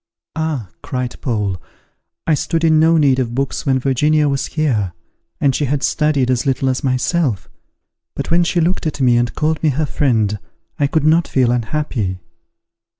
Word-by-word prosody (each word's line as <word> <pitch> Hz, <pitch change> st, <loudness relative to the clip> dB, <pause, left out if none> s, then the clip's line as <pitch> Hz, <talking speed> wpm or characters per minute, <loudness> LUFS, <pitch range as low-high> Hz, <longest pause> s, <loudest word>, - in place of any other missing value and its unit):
"Ah!" 155 Hz, -, -3 dB
cried 125 Hz, -1 st, -3 dB
Paul, 105 Hz, -, -2 dB, 0.6 s
"I 165 Hz, -, +2 dB
stood 165 Hz, +2 st, -1 dB
in 160 Hz, -1 st, +4 dB
no 165 Hz, +1 st, +4 dB
need 140 Hz, -4 st, +3 dB
of 120 Hz, -2 st, -2 dB
books 135 Hz, +3 st, -2 dB
when 135 Hz, -1 st, +3 dB
Virginia 145 Hz, +4 st, +2 dB
was 140 Hz, -1 st, -1 dB
here, 115 Hz, -, -1 dB, 0.5 s
and 140 Hz, -2 st, +2 dB
she 145 Hz, -, 0 dB
had 140 Hz, +1 st, -1 dB
studied 145 Hz, -5 st, +1 dB
as 125 Hz, -1 st, +1 dB
little 135 Hz, -1 st, 0 dB
as 130 Hz, -, -2 dB
myself; 130 Hz, -, 0 dB, 0.7 s
but -, -, -4 dB
when 175 Hz, +1 st, +4 dB
she 175 Hz, +1 st, 0 dB
looked 170 Hz, 0 st, 0 dB
at 150 Hz, -, -4 dB
me, 125 Hz, -3 st, +4 dB
and 120 Hz, 0 st, 0 dB
called 155 Hz, 0 st, 0 dB
me 155 Hz, -, +3 dB
her 150 Hz, +3 st, 0 dB
friend, 115 Hz, -6 st, 0 dB, 0.4 s
I 145 Hz, -, +3 dB
could 155 Hz, +1 st, 0 dB
not 165 Hz, +2 st, +3 dB
feel 125 Hz, -3 st, +2 dB
unhappy." 115 Hz, -5 st, -2 dB
135 Hz, 175 wpm, -18 LUFS, 125-155 Hz, 0.7 s, in